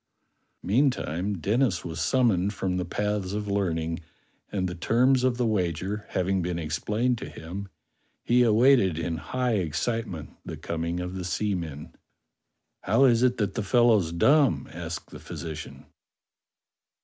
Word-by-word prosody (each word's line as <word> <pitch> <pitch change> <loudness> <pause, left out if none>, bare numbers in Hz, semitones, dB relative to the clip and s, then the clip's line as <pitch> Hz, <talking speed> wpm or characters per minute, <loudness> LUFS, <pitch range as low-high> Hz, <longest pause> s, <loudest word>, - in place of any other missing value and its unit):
Mean 130 +9 +3
time, 95 -4 -3
Denis 105 - +1
was 85 -1 -4
summoned 100 -1 +2
from 95 -2 -1
the 90 - -1
paths 105 -2 -2
of 105 0 -3
learning, 85 -5 -1 0.5
and 95 -2 -1
the 90 - -4
terms 125 +8 +3
of 130 -2 +2
the 125 - +1
wager 95 0 -1
having 95 +1 0
been 90 0 -2
explained 105 +10 -1
to - - -6
him, 95 +5 -7 0.6
he 125 +1 +3
awaited 115 - +4
in 85 0 -2
high 120 - -1
excitement 90 +1 -2
the - - -7
coming 85 +1 -3
of 90 +1 -4
the 95 -1 -4
seamen. 85 -6 -3 0.9
"How 115 +8 +4
is 120 -3 +4
it 125 0 +3
that 105 -3 -1
the - - -2
fellow's 105 -4 +3
dumb?" 85 - +3
asked 85 -1 -6
the - - -9
phy - - -9
sician. 80 -3 -7
95 Hz, 150 wpm, -27 LUFS, 85-115 Hz, 0.9 s, awaited